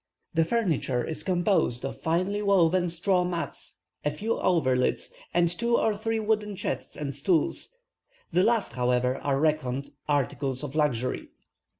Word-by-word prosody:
The 165 0 +4
furniture 160 - 0
is 160 - -3
composed 175 - +1
of 135 - -6
finely 185 +5 0
woven 185 -3 +3
straw 180 +2 +2
mats, 175 -1 -5 0.2
a 150 - +2
few 205 +10 -3
coverlids, 130 - +1 0.2
and 175 +1 +3
two 235 +8 +1
or 220 -1 +2
three 225 +2 -1
wooden 210 -1 0
chests - - -4
and 145 -2 -3
stools; 160 - 0 0.6
the 180 +2 +3
last, 230 +1 +2
however, 125 +1 +1
are 135 -1 0
reckoned 140 -3 0 0.2
articles 140 -1 0
of 145 -2 -5
luxury. 135 -5 0
165 Hz, 140 wpm, -27 LUFS, 140-200 Hz, 0.6 s, The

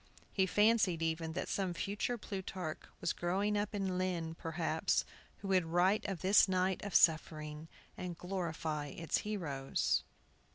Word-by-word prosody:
He 190 -2 +3
fancied, 205 -5 +3
even, 160 0 -1
that - - -3
some 185 -3 -1
future 205 +7 -1
Plutarch 190 -6 -5 0.2
was 170 - 0
growing 195 +4 0
up 205 +1 -1
in 190 -2 -1
Lynn, 175 -3 -1
perhaps, 160 -1 0 0.4
who 195 - -4
would 185 -3 +3
write 180 +5 +2
of 190 -5 -4
this 195 +3 +6
night 185 0 +1
of 205 -2 -4
suffering, 155 -1 +2 0.3
and 180 -2 -5
glorify 165 -5 -3
its 165 +3 -1
heroes. 155 -11 -1
180 Hz, 140 wpm, -35 LUFS, 160-195 Hz, 0.4 s, this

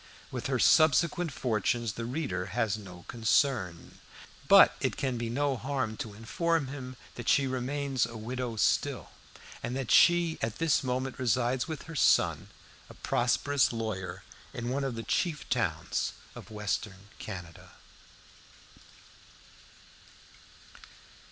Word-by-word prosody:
With - - -4
her - - 0
subsequent 160 +2 +4
fortunes 115 -2 -1
the 115 +3 -5
reader 125 - -3
has 110 -4 +1
no 90 -4 -11
concern; 110 - 0 0.5
but - - +8
it - - -1
can 130 -2 -1
be 115 -1 -3
no 140 +3 0
harm 130 -2 -2
to 105 -3 -6
inform 150 +6 -1
him 130 -2 -7 0.2
that 120 - -4
she 140 - +4
remains 130 0 -1
a 115 0 -8
widow 120 +1 -4
still, 110 - 0 0.5
and 125 - -3
that 135 -3 -3
she 170 -1 +5
at 110 0 -2
this 160 -3 +2
moment 130 +1 -2
resides 125 +1 +1
with 160 -2 -5
her 165 - -9
son - - +3 0.4
a - - -12
prosperous 130 +3 +1
lawyer 110 -5 -4 0.3
in 120 0 -3
one 135 +2 -1
of 135 -3 -2
the 115 - -5
chief 150 -1 -1
towns - - -1 0.2
of - - -11
Western 105 -2 -4
Canada. 90 -6 -9
125 Hz, 130 wpm, -29 LUFS, 110-140 Hz, 0.5 s, but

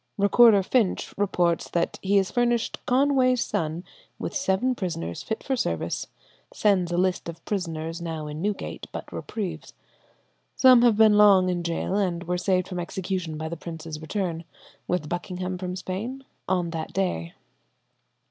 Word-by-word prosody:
Recorder 205 0 +6
Finch 220 -1 0
reports 180 -4 +1
that 170 -1 -1
he 200 +1 +2
has 190 -1 +1
furnished 240 -1 0
"Conway's 255 -1 +3
son 160 +2 -2 0.3
with - - -5
seven 255 -1 +1
prisoners 165 - -4
fit 220 - -4
for 270 - 0
service; 85 - -2 0.4
sends 190 -4 +2
a 175 - 0
list 185 -1 0
of 165 0 -10
prisoners 165 -4 -3
now 160 -2 -4
in 150 +1 -6
Newgate, 205 +1 -3
but - - -7
reprieved. 205 -6 -5 0.8
Some 255 -2 +7
have 235 -3 +4
been 215 -1 +6
long 195 -3 +6
in 175 -1 -1
gaol, 170 +3 -1
and 180 -4 0
were 180 +1 -2
saved 185 0 +1
from 180 -2 -4
execution 175 -2 -3
by 160 +1 -4
the 165 - -4
prince's 160 -1 -7
return 170 -1 -3 0.4
[with 175 -4 -1
Buckingham 180 +2 -4
from 180 -1 -4
Spain?] 220 +9 -5 0.2
on 180 -3 0
that 160 -1 -5
day. 85 - -2
185 Hz, 155 wpm, -25 LUFS, 170-210 Hz, 0.8 s, Some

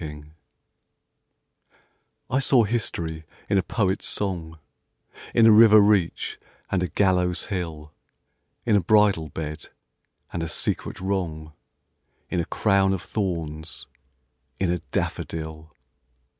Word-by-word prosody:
SYMBOLS 75 -1 -9 2.0
I 130 - +2
saw 135 -3 +4
history 85 -8 -3 0.2
in 100 - +3
a - - +2
poet's 95 0 -1
song, 85 -5 -2 0.8
In 115 - +6
a 115 - +8
river 110 0 +8
reach 100 -4 +1 0.3
and 95 - +1
a 90 - 0
gallows 90 -2 +1
hill, 80 -5 -5 0.7
In 110 - +3
a 100 - +4
bridal 100 -4 +3
bed, 75 0 -6 0.6
and 85 - -2
a 80 - -3
secret - - -2
wrong, 85 -5 -3 0.8
In 90 - 0
a 85 - 0
crown 100 0 +2
of 95 - -4
thorns: 80 -6 -4 0.7
in 95 -2 +1
a 90 - -1
daffodil. 80 -1 -4
90 Hz, 115 wpm, -24 LUFS, 80-100 Hz, 2.0 s, a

